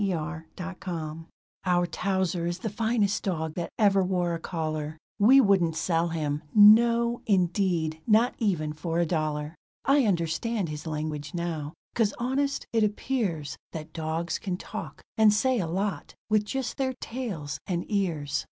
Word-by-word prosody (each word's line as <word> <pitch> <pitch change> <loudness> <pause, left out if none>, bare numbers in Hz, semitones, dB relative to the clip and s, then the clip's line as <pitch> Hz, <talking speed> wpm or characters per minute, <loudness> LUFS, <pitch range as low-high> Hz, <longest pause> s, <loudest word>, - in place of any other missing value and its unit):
DOG 170 -3 -2
LANGUAGE 170 -4 -5 0.4
Our 175 -1 +2
Towser 180 -1 -1
is 175 0 -2
the 210 +3 -4
finest 220 -2 +1
dog 160 -5 -2
that 170 0 -3
ever 200 -2 +4
wore 180 -2 0
a 165 - -3
collar, 155 -2 -3 0.2
We 250 +7 +7
wouldn't 190 -8 +3
sell 165 +1 +1
him 150 -3 -2
no, 235 +3 +6
indeed 175 -5 +1
not 230 +3 +4
even 170 -9 0
for 165 +1 -3
a 170 - +3
dollar! 155 -2 -1 0.3
I 275 -1 +4
understand 185 +2 0
his 150 +1 -6
language 150 -1 -4
now, 165 -2 -3 0.2
'cause 220 -4 +1
honest, 275 +3 -1
it 225 -1 +3
appears 205 - -1 0.2
That 155 -1 -7
dogs 160 +1 -2
can 185 -3 -3
talk, - - -7 0.2
and 215 -1 +7
say 250 +4 +2
a 175 - -1
lot, 195 +4 -3 0.2
with 210 -1 +3
just 265 +2 -3
their 265 -1 0
tails 200 - -4
and 175 -2 -1
ears. 160 -9 -1
180 Hz, 150 wpm, -27 LUFS, 160-210 Hz, 0.4 s, We